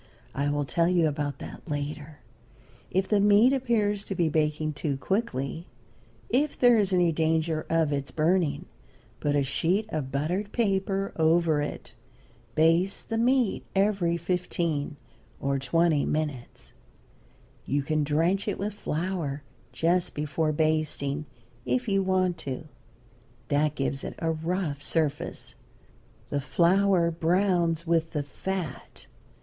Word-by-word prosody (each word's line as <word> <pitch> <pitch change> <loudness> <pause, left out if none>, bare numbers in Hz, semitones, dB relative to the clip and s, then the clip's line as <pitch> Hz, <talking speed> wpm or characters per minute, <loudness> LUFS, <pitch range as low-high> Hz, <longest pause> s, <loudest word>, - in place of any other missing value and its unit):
I 140 +1 0
will 145 0 0
tell 170 +6 +1
you 175 -3 +3
about 145 -1 -2
that - - -9
later. 150 +1 -5 0.7
If 190 +1 0
the 210 - +3
meat 210 +5 +5
appears 215 -6 +1
to 195 - -4
be 170 -2 +2
baking 155 0 0
too 145 -1 -2
quickly, 165 - -2 0.6
if 295 -4 +1
there 245 -2 +5
is 200 -2 +1
any 175 -2 +3
danger 160 0 0
of 160 -3 +2
its 140 -1 -2
burning, 165 0 +1 0.5
put 145 -1 0
a 145 - +3
sheet 175 +10 0
of 145 -7 -3
buttered 175 +9 -1
paper 195 -3 0
over 160 -1 +3
it. 145 - -6 0.6
Baste 165 +5 +2
the 225 - -1
meat 245 -2 +2
every 195 -4 +2
fifteen 170 -5 -2 0.4
or 140 0 0
twenty 155 +3 +2
minutes. 150 -5 -4 0.9
You 140 0 0
can 155 +1 0
drench 165 +8 +1
it 205 - -1
with 205 +2 -3
flour, 160 -6 -3 0.3
just 175 +2 +1
before 150 +1 0
basting, 155 -2 0 0.4
if 250 - -1
you 195 -1 +2
want 185 -2 +1
to. 135 +3 -5 0.8
That 150 +1 +2
gives 135 0 -2
it - - -5
a 165 -1 0
rough 160 -2 -2
surface. 150 -1 -2 0.8
The 145 - 0
flour 175 +3 +3
browns 170 0 +1
with 165 -1 +1
the 150 -2 -1
fat. 185 +4 -5
165 Hz, 135 wpm, -27 LUFS, 150-190 Hz, 0.9 s, meat